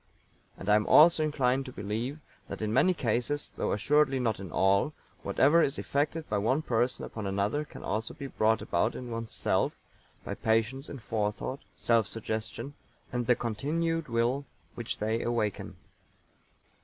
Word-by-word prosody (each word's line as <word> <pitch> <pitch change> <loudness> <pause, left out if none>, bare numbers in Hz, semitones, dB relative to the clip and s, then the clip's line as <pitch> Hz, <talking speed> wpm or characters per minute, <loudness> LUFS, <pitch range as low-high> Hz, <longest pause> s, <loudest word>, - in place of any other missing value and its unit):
And 95 - -9
I 105 - +5
am 105 0 +2
also 160 0 +7
inclined 135 -3 +1
to - - -6
believe 115 +7 -3 0.3
that - - -5
in 105 0 -1
many 185 +9 +5
cases, 135 -1 -1
though - - -1
assuredly 135 +5 +3
not 115 -5 0
in 95 -4 -7
all, 100 - +2 0.3
whatever 150 +5 +4
is 140 -2 +1
effected 155 +3 -1
by 105 -1 0
one 130 +9 +1
person 120 0 0
upon 110 -3 -5
another 100 +9 0
can - - -11
also 110 +2 -3
be 140 - -7
brought 110 -4 +1
about 105 +7 0
in 125 -1 -6
one's 115 -1 -4
self - - +1 0.5
by - - -3
patience 115 +5 0
in 140 - -6
forethought, 110 +3 -2 0.2
self 115 +2 +2
suggestion, 110 +4 -4 0.4
and 120 -1 -1
the 125 - +5
continued 155 +9 -1
will 120 +4 +1 0.3
which 120 -2 -4
they 110 +2 -1
awaken. 115 -4 -2
120 Hz, 160 wpm, -29 LUFS, 110-140 Hz, 0.5 s, also